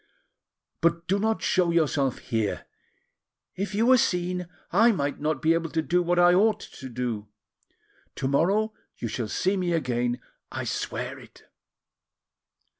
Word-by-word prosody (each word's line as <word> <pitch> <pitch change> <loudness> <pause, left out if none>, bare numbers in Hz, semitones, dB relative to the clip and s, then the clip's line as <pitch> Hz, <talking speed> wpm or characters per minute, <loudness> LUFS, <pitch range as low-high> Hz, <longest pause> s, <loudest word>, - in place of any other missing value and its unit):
But 170 0 +1
do 195 +2 +2
not 220 +1 0
show 180 -2 +2
yourself 145 -5 +1
here; 110 -5 -2 0.9
if 200 +1 -3
you 220 +3 +2
were 255 0 +6
seen, 180 -2 0 0.2
I 235 +1 +5
might 145 -8 -2
not 150 -2 -1
be 160 +1 +5
able 165 0 -1
to 160 - 0
do 175 +2 +2
what 175 0 +1
I 175 0 +6
ought 210 +3 +4
to 130 - -10
do. 120 -4 -3 0.9
To 130 - -2
morrow 195 +10 +2 0.2
you 115 - -3
shall 115 0 -3
see 185 - 0
me 180 -2 0
again, 125 -5 0 0.3
I - - -4
swear - - -3
it. - - -16
170 Hz, 150 wpm, -26 LUFS, 135-185 Hz, 0.9 s, were